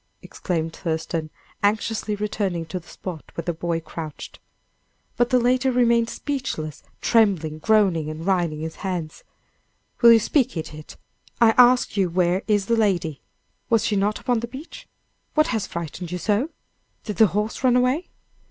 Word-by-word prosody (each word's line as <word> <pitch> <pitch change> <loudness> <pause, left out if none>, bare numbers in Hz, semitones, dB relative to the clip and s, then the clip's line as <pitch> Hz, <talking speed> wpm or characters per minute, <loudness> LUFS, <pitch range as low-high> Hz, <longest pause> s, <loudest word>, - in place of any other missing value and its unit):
exclaimed 165 -3 -3
Thurston, 160 -1 -3 0.3
anxiously 215 +1 0
returning 200 -5 -2
to 165 +3 -5
the 175 - -21
spot 175 -5 -8
where 170 - -3
the 175 - -2
boy 170 0 -2
crouched. 160 -2 -8 0.8
But 240 0 +2
the 255 - +4
latter 255 +2 +2
remained 235 -2 +3
speechless, 240 - -4 0.2
trembling, 185 -9 +2
groaning, 190 -6 +2
and 155 +1 -6
wringing 175 -5 0
his 160 0 -5
hands. 175 -5 -4 0.8
"Will 235 -1 +9
you 225 - +6
speak, 250 - +1
idiot? 155 -1 -7 0.4
I 230 -2 +6
ask 245 -3 +5
you 190 -3 +2
where 180 +2 +1
is 205 -3 +2
the 230 - +2
lady? 175 - 0 0.5
Was 230 -2 +3
she 210 - +1
not 205 +2 +1
upon 245 -2 0
the 235 - -4
beach? 300 - -10 0.5
What 305 0 +5
has 220 -3 -1
frightened 170 +1 -6
you 180 - -2
so? 210 - 0 0.5
Did 210 - -5
the 220 - +7
horse 215 +4 -2
run 250 -2 +4
away?" 255 +7 +1
200 Hz, 160 wpm, -23 LUFS, 165-235 Hz, 0.8 s, Will